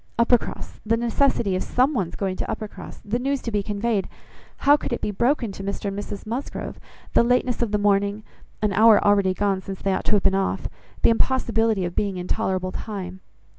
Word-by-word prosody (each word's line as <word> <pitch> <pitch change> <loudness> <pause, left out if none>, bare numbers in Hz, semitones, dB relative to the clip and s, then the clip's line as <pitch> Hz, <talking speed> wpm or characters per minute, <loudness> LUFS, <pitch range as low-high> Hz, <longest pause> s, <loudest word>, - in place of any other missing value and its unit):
"Uppercross, 235 0 +1
the 225 +1 +1
necessity 235 -3 +1
of 185 - -1
some 260 +4 +1
one's 195 - -2
going 190 -2 -2
to - - -4
Uppercross; 215 -2 -7
the 220 +4 -1
news 275 +2 0
to 230 - -3
be 205 -1 +1
conveyed; 205 0 -1 0.6
how 285 - +8
it 295 - +4
could 240 - -3
be 210 - -2
broken 240 +2 +1
to 195 - -8
Mr 200 +1 -3
and 200 +1 -4
Mrs 205 0 -7
Musgrove; 240 +6 -5 0.3
the - - +6
lateness 245 0 +1
of 235 - +1
the 210 - +2
morning; 205 +1 +1 0.4
an 210 -1 +2
hour 215 +1 +7
already 200 -2 +3
gone 195 -1 0
since 190 0 -7
they 195 - +1
ought - - -2
to - - +1
have 205 - +3
been 195 - +3
off; 195 0 0 0.4
the - - +6
impossibility 225 -5 +1
of 175 - -5
being 200 -3 -1
in 180 0 -5
tolerable 185 -1 -1
time." 190 -4 -6
210 Hz, 210 wpm, -23 LUFS, 195-235 Hz, 0.6 s, how